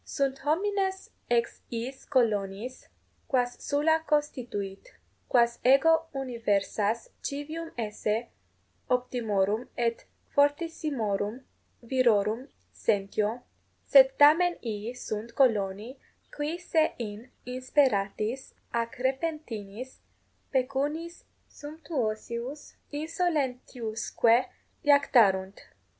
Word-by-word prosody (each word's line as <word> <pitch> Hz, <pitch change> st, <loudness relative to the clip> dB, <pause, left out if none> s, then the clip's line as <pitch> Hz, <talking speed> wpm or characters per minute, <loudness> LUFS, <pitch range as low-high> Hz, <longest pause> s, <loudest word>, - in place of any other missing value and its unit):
Sunt 270 Hz, -1 st, -1 dB
homines 380 Hz, +5 st, 0 dB, 0.2 s
ex 235 Hz, -1 st, +1 dB
iis 245 Hz, +3 st, -5 dB
coloniis, 220 Hz, -1 st, 0 dB, 0.4 s
quas 245 Hz, -2 st, 0 dB
Sulla 315 Hz, +3 st, +2 dB
constituit: 250 Hz, -, -2 dB, 0.4 s
quas 235 Hz, -1 st, +3 dB
ego 320 Hz, +6 st, +5 dB
universas 225 Hz, -3 st, -1 dB
civium 310 Hz, +4 st, -4 dB
esse 220 Hz, +1 st, -2 dB, 0.6 s
optimorum 225 Hz, -3 st, 0 dB
et 235 Hz, -1 st, -1 dB, 0.3 s
fortissimorum 285 Hz, -, 0 dB, 0.4 s
virorum 235 Hz, -1 st, +2 dB, 0.3 s
sentio, 210 Hz, +2 st, 0 dB, 0.4 s
sed -, -, +8 dB
tamen 330 Hz, +5 st, +6 dB, 0.2 s
ii 210 Hz, +3 st, -5 dB
sunt 230 Hz, -1 st, -5 dB
coloni, 225 Hz, -1 st, +1 dB, 0.4 s
qui 295 Hz, +3 st, -2 dB
se 330 Hz, -3 st, +1 dB
in 225 Hz, +1 st, -6 dB, 0.2 s
insperatis 250 Hz, -2 st, 0 dB, 0.2 s
ac 230 Hz, 0 st, 0 dB, 0.2 s
repentinis 260 Hz, -6 st, -4 dB, 0.6 s
pecuniis 285 Hz, +6 st, -1 dB, 0.2 s
sumptuosius 280 Hz, -3 st, -4 dB, 0.4 s
insolentiusque 255 Hz, -9 st, +1 dB, 0.5 s
iactarunt. 220 Hz, -10 st, +4 dB
250 Hz, 75 wpm, -28 LUFS, 220-290 Hz, 0.6 s, sed